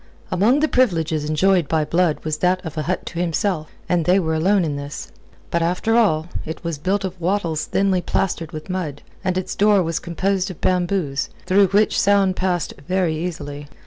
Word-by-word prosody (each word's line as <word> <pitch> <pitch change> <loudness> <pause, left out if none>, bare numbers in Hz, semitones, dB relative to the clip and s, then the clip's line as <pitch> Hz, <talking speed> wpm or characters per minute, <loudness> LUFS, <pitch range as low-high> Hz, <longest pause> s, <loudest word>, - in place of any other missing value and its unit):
Among 235 +10 +3
the 310 - +3
privileges 165 - +1
enjoyed 175 +1 +3
by 155 0 +1
Blood 170 0 +1
was 155 -1 -1
that 180 +1 +1
of 160 -1 -6
a 155 - -1
hut 180 +4 -2
to 170 - -5
himself, 175 -1 -1 0.2
and 175 -2 +2
they 180 +2 +4
were 160 -3 -1
alone 180 +4 +2
in 150 -2 -2
this. 140 +1 -7 0.4
But, 170 - +1
after 180 +7 +1
all, 165 -9 +3 0.2
it 160 +3 -7
was 165 -3 -3
built 195 +5 0
of 185 -1 -6
wattles 170 -3 0
thinly 190 -2 +1
plastered 170 -3 -1
with 155 -2 -7
mud, 175 -7 -4 0.2
and 185 -1 0
its 185 - -3
door 205 -2 +4
was 165 -1 -2
composed 190 +2 -1
of 185 - -9
bamboos, 175 -6 0 0.2
through 195 +1 +4
which 205 +3 +2
sound 200 -2 +3
passed 180 -4 -1
very 180 -3 +1
easily. 145 -4 -5
180 Hz, 190 wpm, -21 LUFS, 160-190 Hz, 0.4 s, they